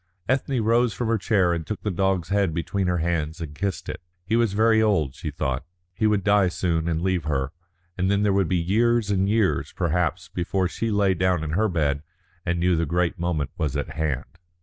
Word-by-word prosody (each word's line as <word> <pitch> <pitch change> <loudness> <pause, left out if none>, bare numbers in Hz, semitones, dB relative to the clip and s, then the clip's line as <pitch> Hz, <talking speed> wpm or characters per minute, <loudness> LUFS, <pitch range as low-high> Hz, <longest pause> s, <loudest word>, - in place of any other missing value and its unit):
Ethne 130 -1 0
rose 115 -1 +2
from 120 -2 -2
her 115 -1 +2
chair 95 -4 +2
and 80 -2 -4
took 105 - -5
the 105 - -1
dog's 95 -2 0
head 100 -5 +1
between 90 +3 -1
her 90 0 +1
hands 80 -1 -1
and 80 -3 -6
kissed 95 +4 -3
it. - - -5 0.2
He 110 - 0
was 115 -4 +2
very 110 +1 +4
old, 95 -11 +2
she - - -5
thought; 65 -1 -2 0.3
he 110 +4 +1
would 105 -2 +2
die 100 -1 +4
soon 85 -2 -1
and 80 0 -1
leave 90 -4 0
her, 70 -3 -1 0.5
and 95 +1 +1
then 100 +1 +2
there 100 -1 +3
would 95 -3 +2
be 95 - +2
years 110 +5 +2
and 95 0 +1
years, 110 -2 +1
perhaps, 85 +1 -1
before 90 +1 -1
she 115 +5 -3
lay 100 -2 +3
down 90 -2 +1
in 80 - -3
her 105 +6 +2
bed 75 -5 0 0.4
and 85 -1 -1
knew 90 +1 +3
the 85 -1 0
great 85 +2 0
moment 80 -5 -1
was 75 -4 -1
at 70 - -3
hand. 80 +2 -3
90 Hz, 215 wpm, -24 LUFS, 80-100 Hz, 0.5 s, very